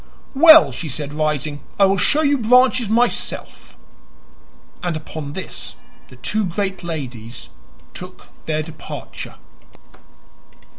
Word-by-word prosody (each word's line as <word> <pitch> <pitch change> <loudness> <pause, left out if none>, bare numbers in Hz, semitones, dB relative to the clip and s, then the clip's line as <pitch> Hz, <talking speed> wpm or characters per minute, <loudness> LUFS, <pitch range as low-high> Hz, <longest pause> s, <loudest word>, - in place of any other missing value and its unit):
"Well," 315 +3 +8
she 160 - -5
said, 145 +2 -4
rising, 150 -1 -2 0.2
"I 200 - +6
will 195 0 +2
show 300 +10 +3
you 285 -2 +2
Branches 250 0 +4
myself." 240 +2 -1 1.0
And 175 -3 -2
upon 155 -2 -7
this 190 - -6 0.3
the - - -15
two 215 0 -1
great 190 0 -3
ladies 125 - -6 0.4
took - - -10 0.2
their 155 -1 0
departure. 155 0 -8
175 Hz, 110 wpm, -20 LUFS, 150-230 Hz, 1.0 s, Well